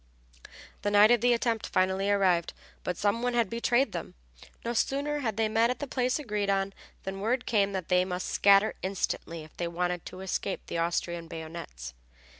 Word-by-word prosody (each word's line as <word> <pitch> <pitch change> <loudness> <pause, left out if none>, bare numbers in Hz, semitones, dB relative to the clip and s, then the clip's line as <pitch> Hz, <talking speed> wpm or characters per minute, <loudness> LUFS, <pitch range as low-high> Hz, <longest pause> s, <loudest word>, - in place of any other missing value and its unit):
The 205 - 0
night 205 +2 +6
of 240 -2 +4
the 245 +1 +4
attempt 230 -2 0
finally 190 +1 +1
arrived 185 -4 +2 0.3
but 180 - -2
some 205 +3 +1
one 245 0 0
had 235 -5 +2
betrayed 240 +3 +2
them. - - -6 0.5
No 235 - -1
sooner 285 +5 0
had 225 -7 -2
they 225 -1 +2
met 225 +2 +3
at 250 - -1
the 285 - -4
place 255 -2 0
agreed 210 -8 -2
on 195 0 +1 0.3
than 195 0 -5
word 245 +4 0
came 200 -4 +2
that 185 -3 -3
they 180 0 +4
must 185 0 -3
scatter 200 +1 +5
instantly 180 -3 -3
if 155 - -16
they 175 - -1
wanted 175 0 -2
to 185 - -9
escape 190 +1 -2
the 170 - -3
Austrian 170 0 -1
bayonets. 160 - -7
200 Hz, 190 wpm, -29 LUFS, 180-235 Hz, 0.5 s, night